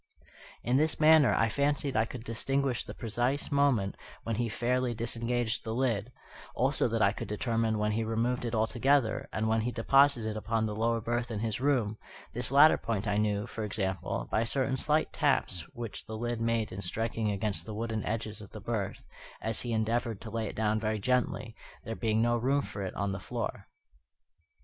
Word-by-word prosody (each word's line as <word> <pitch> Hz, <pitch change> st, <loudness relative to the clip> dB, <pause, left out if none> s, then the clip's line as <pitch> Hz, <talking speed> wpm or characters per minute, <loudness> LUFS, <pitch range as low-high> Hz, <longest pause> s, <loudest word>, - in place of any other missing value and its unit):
In 125 Hz, +2 st, +2 dB
this 155 Hz, +2 st, +1 dB
manner 155 Hz, -3 st, +7 dB
I 115 Hz, -, +3 dB
fancied 140 Hz, +2 st, 0 dB
I 110 Hz, +1 st, +3 dB
could 115 Hz, 0 st, -8 dB
distinguish 130 Hz, +2 st, 0 dB
the -, -, -8 dB
precise 120 Hz, +7 st, -1 dB
moment 140 Hz, -9 st, +2 dB, 0.3 s
when 115 Hz, -2 st, -2 dB
he 120 Hz, -1 st, 0 dB
fairly 125 Hz, +2 st, 0 dB
disengaged 115 Hz, 0 st, 0 dB
the 110 Hz, 0 st, -3 dB
lid, 120 Hz, -3 st, 0 dB, 0.4 s
also -, -, +2 dB
that -, -, +1 dB
I -, -, +5 dB
could -, -, -6 dB
determine 115 Hz, +1 st, 0 dB
when 105 Hz, 0 st, +1 dB
he 110 Hz, +2 st, 0 dB
removed 115 Hz, +3 st, 0 dB
it 120 Hz, -1 st, -2 dB
altogether, 130 Hz, +3 st, +2 dB
and 110 Hz, 0 st, -1 dB
when 110 Hz, 0 st, +2 dB
he 120 Hz, +3 st, -1 dB
deposited 125 Hz, -1 st, +3 dB
it 110 Hz, -, -5 dB
upon 110 Hz, +1 st, 0 dB
the 105 Hz, -1 st, -3 dB
lower 115 Hz, +1 st, +1 dB
berth 120 Hz, +1 st, -1 dB
in 110 Hz, -3 st, -3 dB
his 110 Hz, 0 st, -2 dB
room; 120 Hz, -7 st, +1 dB, 0.3 s
this 120 Hz, +1 st, -3 dB
latter 145 Hz, +3 st, +7 dB
point 110 Hz, -2 st, -2 dB
I 105 Hz, 0 st, +1 dB
knew, 105 Hz, 0 st, +1 dB
for 115 Hz, -2 st, -5 dB
example, 95 Hz, -4 st, -2 dB
by 110 Hz, -, +2 dB
certain 130 Hz, +3 st, 0 dB
slight 150 Hz, +4 st, +1 dB
taps 90 Hz, -4 st, +1 dB
which 115 Hz, -3 st, -7 dB
the 110 Hz, -, -5 dB
lid 120 Hz, 0 st, -2 dB
made 115 Hz, -1 st, 0 dB
in 95 Hz, -, -5 dB
striking 110 Hz, +3 st, -1 dB
against 100 Hz, +1 st, -2 dB
the 110 Hz, -, -5 dB
wooden 110 Hz, -1 st, -2 dB
edges 110 Hz, -1 st, -3 dB
of 100 Hz, -, -11 dB
the 110 Hz, -, -9 dB
berth 100 Hz, -2 st, -3 dB, 0.4 s
as 110 Hz, -1 st, -2 dB
he 120 Hz, -, -3 dB
endeavoured 115 Hz, 0 st, 0 dB
to 110 Hz, -, -8 dB
lay 115 Hz, -1 st, -2 dB
it -, -, -7 dB
down 110 Hz, 0 st, +1 dB
very 110 Hz, 0 st, -1 dB
gently, 125 Hz, 0 st, 0 dB, 0.3 s
there 115 Hz, -, -4 dB
being 110 Hz, -1 st, +1 dB
no 120 Hz, 0 st, +2 dB
room 135 Hz, +4 st, +1 dB
for 100 Hz, -, -6 dB
it 95 Hz, -2 st, -4 dB
on 100 Hz, -1 st, -1 dB
the 95 Hz, -, -4 dB
floor. -, -, -4 dB
115 Hz, 195 wpm, -30 LUFS, 110-125 Hz, 0.4 s, manner